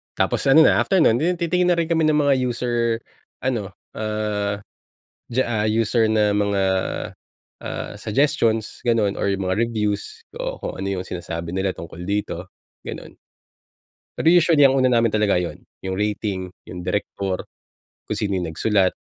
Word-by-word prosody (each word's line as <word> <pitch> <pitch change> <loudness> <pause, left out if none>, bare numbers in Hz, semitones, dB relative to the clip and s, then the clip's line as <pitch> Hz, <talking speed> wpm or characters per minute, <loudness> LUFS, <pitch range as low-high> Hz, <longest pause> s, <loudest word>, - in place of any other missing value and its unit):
tapos - - 0
ano 160 +4 +8
na, - - +5
after 190 -3 +3
no’n, 115 -3 +4 0.2
titingin 175 +1 +1
na - - +1
rin 170 -1 -1
kami 160 -1 +3
ng 155 - +3
mga 145 -2 +4
user 120 0 -2 0.7
ano, 110 -7 -2 0.2
ah, 105 -1 -2 0.7
diyaa 120 -3 +1
user 110 +1 +2
na 105 -1 +3
mga, 100 -1 +1 1.0
ah, - - -5
suggestions, 115 -2 0
gano’n 110 -4 +2
or 100 - 0
‘yung 95 -1 -2
mga 95 - +1
reviews 105 - -3 0.2
o - - -4
kung - - -5
ano 95 - -2
‘yung 95 - -6
sinasabi 85 -1 -5
nila 95 0 0
tungkol 85 +1 -9
dito, 100 -2 -3 0.3
gano’n. - - -8 1.0
Pero - - -3
usually, 170 -4 +5
ang 135 -1 +6
una 130 - +4
namin 115 -2 +3
talaga 105 -3 +3
‘yon, 90 -1 -4 0.2
‘yung 95 - -2
rating, 100 -2 -2 0.2
‘yung 90 - -7
direktor, 95 0 -2 0.6
kung - - -1
sino 100 -3 0
‘yung 90 - -2
nagsulat 100 -1 +2
105 Hz, 155 wpm, -22 LUFS, 100-130 Hz, 1.0 s, ano